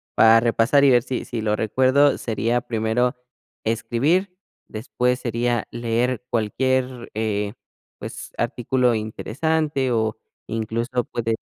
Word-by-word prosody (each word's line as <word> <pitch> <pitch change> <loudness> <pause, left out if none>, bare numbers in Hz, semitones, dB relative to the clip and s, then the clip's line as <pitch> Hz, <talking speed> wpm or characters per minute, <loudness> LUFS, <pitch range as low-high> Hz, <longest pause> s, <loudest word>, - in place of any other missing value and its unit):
para 115 0 +7
repasar 115 +4 +3
y 135 - +6
ver 120 -1 +4
si 130 - -4
si 115 - -4
lo 105 -1 +1
recuerdo 130 +6 +3
sería 115 +1 -1
primero 120 +2 0 0.5
escribir, 150 - 0 0.3
después 125 +3 -1
sería 120 -1 -1
leer 120 +1 -1
cualquier, 125 +2 -1
eh, 105 -2 -1 0.4
pues, - - -8
artículo 125 0 +1
interesante 135 +6 -1
o 110 -2 0 0.3
incluso, 115 +3 -2
puede 115 -1 -2
120 Hz, 115 wpm, -22 LUFS, 110-130 Hz, 0.5 s, para